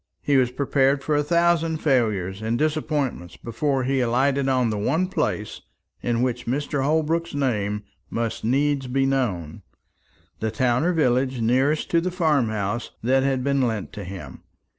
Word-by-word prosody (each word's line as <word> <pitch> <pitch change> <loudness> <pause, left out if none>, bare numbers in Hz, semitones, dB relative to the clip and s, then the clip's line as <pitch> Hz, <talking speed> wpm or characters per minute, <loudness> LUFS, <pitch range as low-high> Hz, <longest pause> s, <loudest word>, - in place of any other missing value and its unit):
He 145 - +2
was 130 -2 +4
prepared 135 +1 +1
for 155 - 0
a 145 - +3
thousand 165 +1 +2
failures 110 - 0
and 110 +2 -1
disappointments 150 - -1
before 135 +3 -1
he 135 +1 0
alighted 135 +3 +1
on 125 -3 +2
the 105 - -2
one 155 - +1
place 105 - -2 0.4
in 120 0 0
which 125 -2 -2
Mr. 145 +2 -1
Holbrook's 160 +2 0
name 105 -7 -1 0.3
must 115 -1 -3
needs 135 +3 +1
be 135 +2 +1
known, 105 - -1 0.8
the 110 - -1
town 120 +3 +1
or 175 - +2
village 130 -4 +1
nearest 130 +7 +1
to 170 - +3
the 185 - -1
farm 155 - +1
house 105 +2 -2
that 130 +3 +3
had 135 -1 0
been 140 0 +1
lent 110 -5 -2
to 105 - -6
him. 90 -8 -9
130 Hz, 160 wpm, -24 LUFS, 115-145 Hz, 0.8 s, was